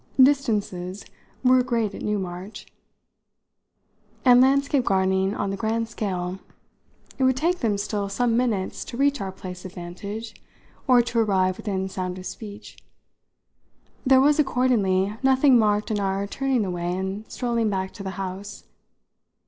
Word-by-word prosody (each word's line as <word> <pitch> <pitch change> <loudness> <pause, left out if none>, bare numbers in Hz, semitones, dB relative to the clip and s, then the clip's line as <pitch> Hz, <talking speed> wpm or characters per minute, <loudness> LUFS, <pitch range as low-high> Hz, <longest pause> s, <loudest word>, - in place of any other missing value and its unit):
Distances 210 -9 +2 0.4
were 255 0 +5
great 230 -4 -1
at - - -8
Newmarch 190 -1 -4 1.6
and 250 -1 +7
landscape 275 0 +3
gardening 190 -1 +1
on 195 - -2
the - - -2
grand 225 +1 -1
scale; 185 -4 -3 0.8
it - - +2
would 260 0 +3
take 345 +5 +1
them 215 -3 0
still 200 0 -2
some 230 +3 +1
minutes 230 -6 -1
to 235 - -7
reach 280 -1 +2
our 190 -1 -3
place 180 -1 -9
of 185 - -8
vantage 200 +6 -7 0.5
or 250 -2 +6
to 235 0 -1
arrive 190 -4 +2
within 190 -3 -2
sound 185 -1 -4
of 185 - -9
speech. 205 -1 -9 1.2
There 265 -1 +5
was 290 +3 +4
accordingly 215 -8 +2
nothing 265 -1 +5
marked 210 0 +1
in 210 - 0
our 195 0 -1
turning 260 +1 0
away 175 -1 -2
and 190 +3 -5
strolling 235 -3 0
back 190 -1 -2
to 210 - -9
the 195 - -4
house. 195 +1 -6
210 Hz, 145 wpm, -24 LUFS, 190-245 Hz, 1.6 s, and